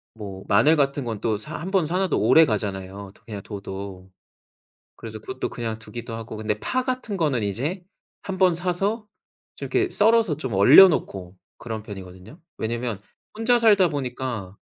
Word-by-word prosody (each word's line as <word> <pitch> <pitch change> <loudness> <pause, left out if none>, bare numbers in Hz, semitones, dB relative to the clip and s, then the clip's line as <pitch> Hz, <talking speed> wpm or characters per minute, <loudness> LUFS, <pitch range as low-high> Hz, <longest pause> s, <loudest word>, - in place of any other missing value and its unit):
뭐 100 -3 -8
마늘 120 +11 +5
같은 140 -2 0
건 115 -4 -4
또 110 -2 0
사 105 - -7
1 180 +4 -5
번 190 -5 +2
사 175 +4 -1
놔도 190 -1 +1
오래가잖아요 100 -7 +1
도 - - -21
그냥 105 -3 -7
둬도. 95 -2 -8 0.9
그래서 110 -1 -8
그것도 130 +4 -5
그냥 115 -2 -4
두기도 115 +1 -8
하고 115 -1 -7
근데 105 -1 -2
파 255 0 -1
같은 250 -5 -3
거는 140 -9 +1
이제 140 - -2 0.4
한번 185 -2 +2
사서 195 +5 -1 0.5
좀 - - -6
이렇게 380 -1 +1
썰어서 225 -8 +3
좀 130 -8 -4
얼려 135 - +9
놓고 95 - -3 0.2
그런 110 -2 -6
편이거든요. 95 - -11 0.2
왜냐면 115 -2 -3 0.4
혼자 240 +2 +3
살다 205 -6 +5
보니까 125 -8 -4
120 Hz, 320 characters per minute, -24 LUFS, -, 0.9 s, 얼려